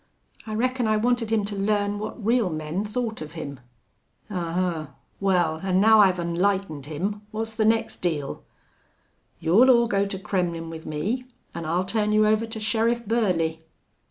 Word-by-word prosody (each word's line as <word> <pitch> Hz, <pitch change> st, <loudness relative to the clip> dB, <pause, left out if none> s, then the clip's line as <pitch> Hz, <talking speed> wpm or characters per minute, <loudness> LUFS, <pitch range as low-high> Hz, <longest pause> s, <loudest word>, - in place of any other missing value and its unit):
"I 215 Hz, -, -3 dB
reckon 250 Hz, +1 st, 0 dB
I 215 Hz, 0 st, +3 dB
wanted 235 Hz, 0 st, +1 dB
him 215 Hz, -2 st, +2 dB
to 205 Hz, 0 st, -4 dB
learn 205 Hz, 0 st, 0 dB
what 215 Hz, 0 st, -6 dB
real 230 Hz, -3 st, +3 dB
men 155 Hz, +5 st, -3 dB
thought 225 Hz, -1 st, -3 dB
of 155 Hz, 0 st, -7 dB
him." 140 Hz, -5 st, -6 dB, 0.7 s
"Ahuh! 175 Hz, -3 st, -1 dB, 0.3 s
Wal, 175 Hz, -5 st, +1 dB
an' 185 Hz, -1 st, +1 dB
now 220 Hz, +2 st, +6 dB
I've 190 Hz, -3 st, +5 dB
onlightened 170 Hz, -3 st, -1 dB
him, 195 Hz, +7 st, -3 dB
what's 220 Hz, +1 st, -4 dB
the 220 Hz, -1 st, +1 dB
next 225 Hz, +1 st, +1 dB
deal?" 150 Hz, -6 st, -3 dB, 1.0 s
"You'll 190 Hz, +11 st, +5 dB
all 235 Hz, -2 st, +5 dB
go 200 Hz, -3 st, +1 dB
to 200 Hz, -1 st, -4 dB
Kremmlin' 175 Hz, -4 st, -2 dB
with 160 Hz, -1 st, -9 dB
me 205 Hz, +12 st, -2 dB, 0.3 s
an' 170 Hz, -1 st, -5 dB
I'll 175 Hz, +3 st, 0 dB
turn 210 Hz, +1 st, 0 dB
you 215 Hz, 0 st, +5 dB
over 215 Hz, +1 st, +2 dB
to 225 Hz, 0 st, -6 dB
Sheriff 230 Hz, +2 st, +1 dB
Burley." 180 Hz, -8 st, 0 dB
200 Hz, 165 wpm, -25 LUFS, 170-220 Hz, 1.0 s, now